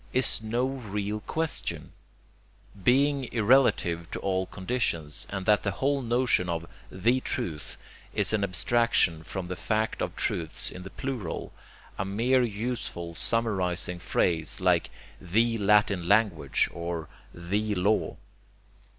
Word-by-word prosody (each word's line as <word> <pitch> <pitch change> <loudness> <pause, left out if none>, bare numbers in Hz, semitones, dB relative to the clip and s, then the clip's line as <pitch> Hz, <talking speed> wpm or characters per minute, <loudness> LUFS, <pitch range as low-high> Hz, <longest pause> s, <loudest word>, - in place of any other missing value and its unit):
is 130 -3 +2
no 115 +3 0
real 105 -5 -3
question 160 +8 -3 0.9
(being 140 +3 +3
irrelative 105 -8 +3
to - - -4
all 95 -1 0
conditions) 95 -8 -2
and 95 -2 -4
that 105 -1 +4
the 100 - -1
whole 140 +3 +1
notion 120 -6 +2
of 85 -1 -2 0.3
THE 115 +8 +2
truth 100 - -4 0.3
is 105 -1 +1
an 105 -2 +2
abstraction 95 -3 +2
from 90 +2 -5
the 90 - -4
fact 110 +4 -1
of - - -2
truths 80 -3 -1
in 90 - -8
the 95 - -8
plural, 125 -9 -5 0.5
a - - +1
mere 115 +7 +2
useful 110 -6 -3
summarizing 90 -5 -1
phrase 80 -3 0
like - - +2 0.3
THE 115 +6 +1
Latin 100 -3 +3
Language 100 -9 +3
or 85 -2 -4 0.2
THE 105 +5 -2
Law. 100 +4 +1
105 Hz, 125 wpm, -28 LUFS, 90-120 Hz, 0.9 s, that